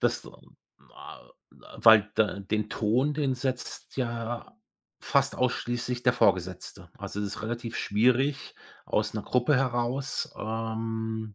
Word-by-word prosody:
Das, - - 0 0.7
a - - -12 0.5
weil 110 -2 +7
da 105 -2 +1
den 105 +2 -1
Ton, 125 +9 +1
den 140 -4 0
setzt 130 0 -4
ja 115 -2 -3 0.4
fast - - +1
ausschließlich 125 0 -1
der 125 - +4
Vorgesetzte. 95 -5 0
Also 105 - -5
es 105 - -1
ist 100 - -6
relativ 115 +1 -4
schwierig 130 +6 +1 0.3
aus 105 0 0
'ner 105 - -2
Gruppe 125 +5 +2
heraus, 130 +1 -1
ähm 110 -1 -3
115 Hz, 120 wpm, -28 LUFS, 110-125 Hz, 0.7 s, weil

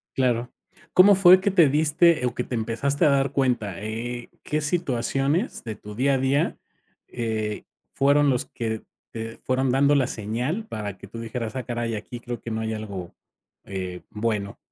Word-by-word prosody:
Claro, 125 -2 +1 0.4
¿cómo 200 +2 +8
fue 185 -1 +7
que 200 - +1
te 175 -6 +5
diste, 155 0 +3
o 120 - -2
que - - -2
te - - -6
empezaste 120 +5 0
a - - +5
dar 135 -1 +2
cuenta? 120 -9 0
Eh 115 +3 -4
eh, - - -21
¿qué 150 - -1
situaciones 145 - 0
de 110 -2 -4
tu 105 0 -10
día 135 +5 +2
a - - +1
día, 135 +3 +1 0.5
eh, 110 -3 -3 0.3
fueron 140 +1 +4
los 125 -2 0
que 110 -2 -4 0.3
te 115 0 -6
fueron 130 0 0
dando 140 +3 +4
la 135 -3 +3
señal 125 - -3
para 105 - -5
que - - -11
tú 115 - -9
dijeras, 115 +1 -4
ah 130 - -2
caray, 120 -1 -2
aquí 115 +3 -6
creo 120 0 -6
que 115 - -6
no 110 0 -2
hay 110 0 -2
algo, 100 -5 -6 0.5
eh, 90 -2 -5
bueno? 105 -2 -2
120 Hz, 185 wpm, -25 LUFS, 110-140 Hz, 0.5 s, cómo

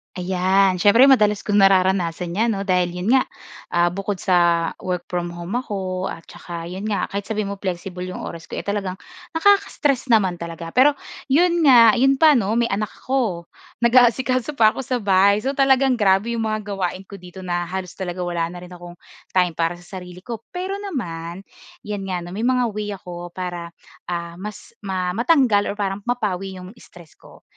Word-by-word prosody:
Ayan, 185 +1 +2
siyempre 230 +8 +6
madalas 210 -5 +3
kung 205 -1 +1
nararanasan 185 -3 +2
'yan 230 +1 +2
'no 195 - -3
dahil 180 -2 +2
'yon 180 +5 -3
nga, 265 -1 +5 0.5
ah, 175 0 +3
bukod 195 +2 -3
sa 170 -3 +3
work 180 -1 -3
from 175 -1 -1
home 175 +7 -4
ako 190 -5 -4
at 165 - -7
saka 170 -1 -8
'yon 190 +3 -6
nga 210 -2 -1
kahit 200 0 -3
sabihin 210 -2 -2
mo 200 - -7
flexible 180 -1 -4
'yong 185 - -6
oras 165 0 -7
ko - - -7
eh, - - -3
talagang 200 -2 -3 0.4
nakaka-stress 325 -8 +2
naman 195 -7 +2
talaga. 165 0 -7
Pero 280 - +5 0.3
'yon 340 +5 +3
nga, 235 -4 +8
'yon 270 +2 +4
pa 315 -1 +8
'no, 225 -6 +1
may 235 0 +1
anak 210 +2 -1
ako. 230 -10 -1 0.4
Nag-aasikaso 255 +3 +3
pa 220 -4 +5
ako - - -8
sa 250 -4 -1
bahay 200 +2 +4
so 270 - 0
talagang 270 -2 +3
grabe 200 +2 +3
'yong 225 -1 -1
mga 215 0 -1
gawain 195 -2 -3
ko 195 +1 -11
dito 180 +1 -11
na 175 -1 -2
halos 185 0 -5
talaga 180 -1 -5
wala 170 -1 -1
na 175 +1 -9
rin 180 - -12
akong 175 -1 -11 0.4
time 180 -1 +3
para 165 +1 -1
sa 175 +2 -10
sarili 180 0 -12
ko. 230 -2 -6
Pero 375 +2 -4
naman, 180 - -5 0.4
'yan 205 -2 -5
nga 180 -2 -3
'no, 175 - -9
may 215 +5 -3
mga 250 -2 +1
way 210 -1 -4
ako 175 -2 -9
para, 175 -2 -5 0.4
ah, 170 0 -5
mas 210 +1 -8
ma 185 -3 -2
matanggal 235 - +3
or 200 - -3
parang 195 -1 -2
mapawi 195 -6 -2
'yong 185 0 -10
stress 170 -3 -17
ko. - - -17
195 Hz, 190 wpm, -21 LUFS, 180-230 Hz, 0.5 s, nga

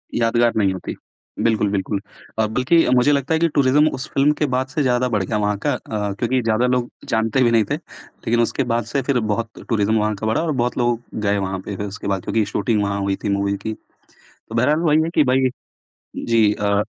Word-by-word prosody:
यादगार 120 0 +2
नहीं 100 -3 +2
होती। 95 - -6 0.5
बिल्कुल, 110 -3 +2
बिल्कुल। 100 0 -1 0.4
अ, 110 - +3
बल्कि 125 +9 +3
अब 125 - +2
मुझे 125 +4 +4
लगता 140 +2 +1
है 160 - +2
कि 170 - +3
टुरिज़म, 145 +2 +4
उस 135 +3 -5
फ़िल्म 140 +2 +4
के 150 - +2
बाद 130 +1 0
से 145 +3 -2
ज़्यादा 125 -1 +2
बढ़ 105 -4 0
गया 105 +3 -2
वहाँ 105 -1 0
का - - +2
अ, 105 -2 -3
क्योंकि 125 +1 +1
ज़्यादा 115 +1 +1
लोग 125 -1 0 0.5
भी 120 - +3
नहीं 115 -2 +4
थे, - - +2
लेकिन 120 +1 -4
उसके 120 +4 0
बाद 120 - +1
से 140 - +1
फिर 130 -1 +1
बहुत 115 +1 -5
टुरिज़म 110 -1 +2
वहाँ 105 0 0
का 110 +2 -4
बढ़ा 110 - +1
और 160 - -1
बहुत 120 +1 -1
लोग 120 -1 +1 0.2
गए 100 0 +2
वहाँ 95 -1 -2
पे 100 - -5
फिर 100 - -3
उसके 100 0 -7
बाद, 95 -2 -1
क्योंकि 110 -2 0
शूटिंग 105 +1 0
वहाँ 100 0 -1
हुई 100 0 0
थी 105 - -1
मूवी 100 0 0
की। 110 +2 -4 0.6
तो 115 - -13
बहरहाल 145 +7 +3
वही 155 -1 +3
है 165 - -2
कि 155 - +5
भई, 130 0 +2 0.7
जी 110 -3 +2
अ 100 0 +2
115 Hz, 225 wpm, -21 LUFS, 105-130 Hz, 0.7 s, कि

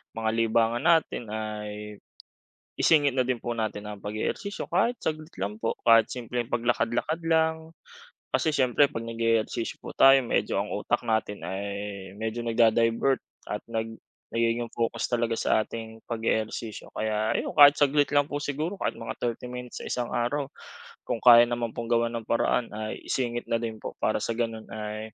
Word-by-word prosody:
mga 110 -1 -1
libangan 115 +1 +2
natin 160 -8 +2
ay 105 -1 -5 0.8
isingit 145 -4 +4
na 130 - +3
din 125 -1 -1
po 120 - -3
natin 110 -2 -3
ang 105 -1 -7
pag-ehersisyo. 110 - -4
Kahit 215 +8 +2
saglit 155 +1 -3
lang 105 +3 -3
po, 115 - -1
kahit 115 -1 +6
simpleng 120 -1 -4
paglakad-lakad 120 +6 0
lang, 160 0 +1 0.6
kasi 160 - +1
siyempre, 130 +1 +4
‘pag 115 - -4
nag-e-ehersisyo 115 0 -1
po - - -7
tayo, 135 0 +8
medyo 120 - 0
ang - - -8
utak - - -1
natin 110 -3 -1
ay 95 +2 -4 0.5
medyo 110 +3 -3
nagda-divert 115 +3 +3 0.3
at 105 - -3
nag 115 -1 -4 0.3
nagiging 115 +1 0
focus 115 -1 -1
talaga 120 -1 0
sa 110 - +2
ating 110 0 -9
pag-e-ehersisyo. 110 -1 -3
Kaya 110 0 -1
ayon, - - -2
kahit 145 0 +8
saglit 145 0 +3
lang 145 0 +3
po 145 - -4
siguro 150 +6 -3
kahit - - -1
mga 115 0 -7
30 120 +1 -3
minutes 125 0 -7
sa - - -6
isang 120 -1 -2
araw, 125 +5 0 0.6
kung 115 - -2
kaya 120 -1 +9
naman 120 -1 -2
pong 120 - -3
gawan 115 0 +2
ng 115 - -7
paraan 115 +1 +1
ay 110 0 -4
isingit 120 -2 -2
na 115 0 -1
din 115 -2 -4
po - - -7
para - - +2
sa 115 - -2
gano'n 115 -1 -3
ay 110 0 -6
115 Hz, 165 wpm, -27 LUFS, 110-130 Hz, 0.8 s, kaya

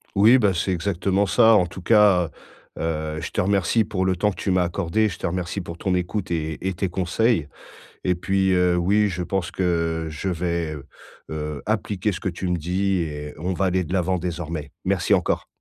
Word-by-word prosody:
Oui, 110 +6 +7
bah 105 -5 +3
c'est 90 +2 -1
exactement 95 +2 0
ça. 110 +2 +5
En 90 - +3
tout 85 +2 -9
cas, 100 -4 +4 0.5
heu - - -8 0.4
heu, - - -3
je - - -5
te - - 0
remercie 100 +3 +2
pour 95 -3 -2
le 95 0 +2
temps 105 +4 +1
que - - -9
tu - - -1
m'as 90 -1 +3
accordé, 90 +5 0
je 85 - -7
te - - -1
remercie 90 +2 -3
pour 85 -2 -7
ton 95 +2 -1
écoute 90 +2 -2
et 80 -2 -2
et 95 - 0
tes 95 +2 -1
conseils 95 -1 0 0.5
et 90 - +2
puis, 95 +2 +1
heu, 90 -1 +3
oui, 100 +4 +3
je 90 -1 -3
pense 95 0 -2
que 85 -3 -1
je 75 +6 -3
vais, 85 -2 -2
heu 70 -3 -9 0.5
heu, 75 -2 -4
appliquer 105 -1 -1
ce 90 - -5
que - - -2
tu 90 +1 -4
me 90 0 0
dis 95 +3 0
et 75 -2 -5
on 90 +4 -2
va 95 +2 0
aller 95 0 +1
de 85 - -9
l'avant 95 0 +1
désormais. 80 -3 -4
Merci 95 +1 +2
encore. 90 - -1
90 Hz, 215 wpm, -23 LUFS, 85-95 Hz, 0.5 s, Oui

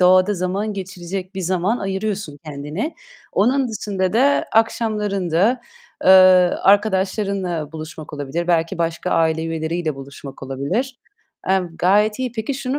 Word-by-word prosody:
doğada 185 +2 +5
zaman 190 +4 -2
geçirecek 190 -1 -6
bir 190 - -4
zaman 185 +6 0
ayırıyorsun 195 -5 -3
kendine. 150 - -4 0.4
Onun 255 +5 +2
dışında 200 -4 -2
da 275 +5 +3
akşamlarında, 210 -2 +1 0.4
eee, 190 - +6 0.5
arkadaşlarınla 195 -5 +1
buluşmak 155 -1 -8
olabilir, 150 +4 -3
belki 170 +1 +1
başka 165 +2 -2
aile 160 0 +2
üyeleriyle 165 0 -2
buluşmak 135 0 -10
olabilir. 175 - -3 0.5
Emm, 180 -3 0
gayet 210 +5 +3
iyi. 255 -2 -2
Peki, 230 +4 -3
şunu 270 +1 -2
190 Hz, 120 wpm, -20 LUFS, 165-210 Hz, 0.5 s, eee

